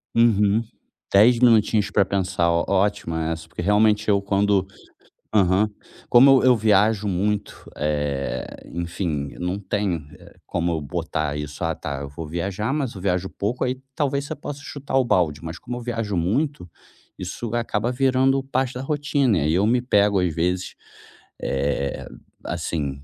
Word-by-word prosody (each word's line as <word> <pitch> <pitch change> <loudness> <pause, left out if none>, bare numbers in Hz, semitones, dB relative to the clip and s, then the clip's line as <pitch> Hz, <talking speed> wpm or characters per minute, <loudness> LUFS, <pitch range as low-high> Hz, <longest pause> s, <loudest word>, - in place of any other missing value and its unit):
Uhum, 110 -2 +4 0.5
10 115 +5 +6
minutinhos 110 -3 +4
pra 100 - +3
pensar 95 -2 0
ó 85 0 +2
ótimo 100 -3 0
essa, 80 0 -3
porque - - -6
realmente 105 +2 +3
eu 100 -1 +3
quando 100 -1 +2 0.7
Aham. 100 +1 +3 0.4
Como 130 +3 +7
eu - - -1
eu 130 -1 +6
viajo 105 0 +3
muito, 100 +2 -2
eh, 75 -2 -2 0.3
enfim 85 -4 -3
eu - - -14
não 90 +3 -2
tenho, 95 -6 -2
eh, - - -17
como 85 +1 -1
eu 80 -2 -2
botar 80 -2 -3
isso 75 +2 -6
"Ah, 80 -1 0
tá 70 -1 -5
eu 70 - -6
vou 75 +3 -7
viajar" 95 - -2
mas 140 -6 -2
eu 95 - -8
viajo 90 0 0
pouco 110 +5 -2
aí 130 0 -1 0.2
talvez 140 -2 0
você - - -4
possa 145 0 -7
chutar 140 -2 -5
o 130 - +3
balde, 85 -9 +1
mas 80 0 -6
como 120 +6 -6
eu - - -6
viajo 115 -4 -2
muito 115 - -1 0.5
isso 120 -2 -5
acaba 115 -1 -1
virando 135 +1 +2
parte 135 -1 -1
da 125 - -5
rotina 140 - +1
aí 75 +2 +1
eu 95 +5 +3
me 120 +2 +2
pego 105 -5 +3
às 90 -3 0
vezes, 90 +3 -1 0.7
eh, 70 0 -2 0.4
assim 70 -4 -3
100 Hz, 165 wpm, -23 LUFS, 85-120 Hz, 0.7 s, Como